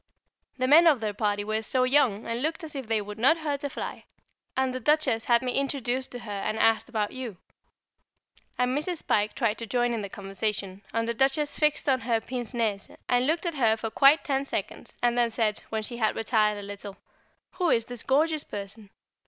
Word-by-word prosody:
The 255 -1 0
men 325 +5 +7
of 295 -6 +5
their 215 -2 -2
party 205 0 0
were 215 +1 -1
so 255 +3 +1
young, 255 -5 +2
and 230 +1 -2
looked 315 +3 -2
as 315 - -7
if 265 -4 -5
they 220 -2 0
would 210 +1 -8
not 275 +8 +5
hurt 290 -3 -3
a 285 - -1
fly, - - -6 0.5
and 260 -1 +1
the 255 - -3
Duchess 275 -4 +2
had 235 +1 +3
me 250 - -1
introduced 260 -2 -1
to 245 - -5
her 215 - -8
and 215 - -2
asked 225 +2 +2
about 215 -4 -1
you. 245 -7 -6 1.2
And 250 +1 +1
Mrs. 315 +3 -3
Pike 210 0 +1
tried 230 -4 0
to 230 - -5
join 245 +1 +1
in 225 - -2
the 200 - -5
conversation, 195 0 -4
and 230 0 -1
the 235 - 0
Duchess 270 +4 +2
fixed 300 -1 +1
on 265 -2 +3
her 230 -1 +1
pince 245 +1 -6
nez 215 -4 -1 0.2
and 245 +1 +2
looked 325 +3 0
at 340 - -1
her 230 -6 +2
for 225 0 -4
quite 280 +5 +5
ten 275 -4 0
seconds, 280 - -5
and 240 0 +3
then 240 -1 +3
said, 220 -2 0
when 220 -1 -2
she 240 +2 -5
had 220 -2 +1
retired 215 -2 +1
a 205 - -7
little, 200 0 -8 0.6
"Who 360 -2 +2
is 230 -5 +2
this 245 -1 -6
gorgeous 305 +3 +1
person?" 200 +1 -8
240 Hz, 215 wpm, -27 LUFS, 215-275 Hz, 1.2 s, men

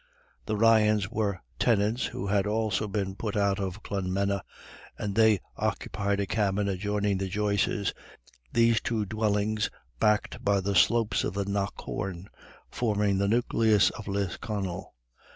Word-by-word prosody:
The 110 - -1
Ryans 105 -3 +4
were 100 -4 -1 0.2
tenants 110 +1 +2
who 95 - -5
had 100 0 +1
also 110 0 0
been 100 -1 -2
put 105 0 -3
out 100 0 +2
of 95 +1 -4
Clonmena, 100 0 -1 0.6
and 100 -1 -3
they 110 -2 +4 0.2
occupied 100 0 -1
a 100 - +1
cabin 100 0 0
adjoining 100 +1 0
the 95 - -2
Joyces', 100 0 0 0.6
these 115 0 +3
two 110 -3 -1
dwellings, 105 0 0 0.3
backed 105 -1 +1
by 100 -1 +3
the 100 +1 -1
slopes 115 +2 +3
of - - -3
the 100 0 -1
Knockawn, 100 -2 -3 0.4
forming 105 -4 +1
the 100 - +2
nucleus 110 -2 +3
of 105 - -9
Lisconnel. 100 - -3
100 Hz, 135 wpm, -28 LUFS, 100-110 Hz, 0.6 s, Ryans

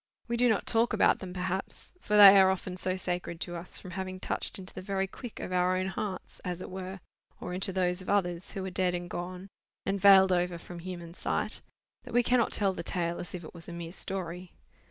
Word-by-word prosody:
We 235 - -1
do 245 +1 +4
not 220 - +1
talk 230 +1 +2
about - - +4
them, 185 -2 -7
perhaps; 185 +1 -4
for 210 - +1
they 200 -1 +11
are 190 - +6
often 190 -1 -2
so 185 0 0
sacred 180 -2 -3
to 175 - -3
us, 170 +1 -4
from 185 - -8
having 185 0 -5
touched - - -1
into 190 -1 -9
the - - -7
very 195 0 -1
quick 230 +4 -9
of - - -5
our 180 0 +2
own 185 +1 -1
hearts, 190 -1 -5
as 180 -1 -3
it 185 - -7
were, 190 0 -6 0.4
or 180 - -5
into 190 +1 -1
those 180 -1 0
of 185 - -8
others 180 -3 0
who 190 -1 -4
are 190 - -4
dead 180 -1 +1
and 175 0 -5
gone, 180 +2 -5 0.4
and 195 0 -1
veiled 190 -1 +8
over 175 -1 +1
from 175 +1 -9
human 175 -1 -7
sight, - - -2 0.4
that - - -8
we 245 - +5
cannot 245 -1 +2
tell 195 -2 +1
the - - -5
tale 170 -1 -2
as 175 - -6
if 175 - -7
it 155 - -10
was 170 -1 -9
a - - -7
mere 170 0 -6
story. 180 -2 -4
185 Hz, 235 wpm, -30 LUFS, 180-195 Hz, 0.4 s, they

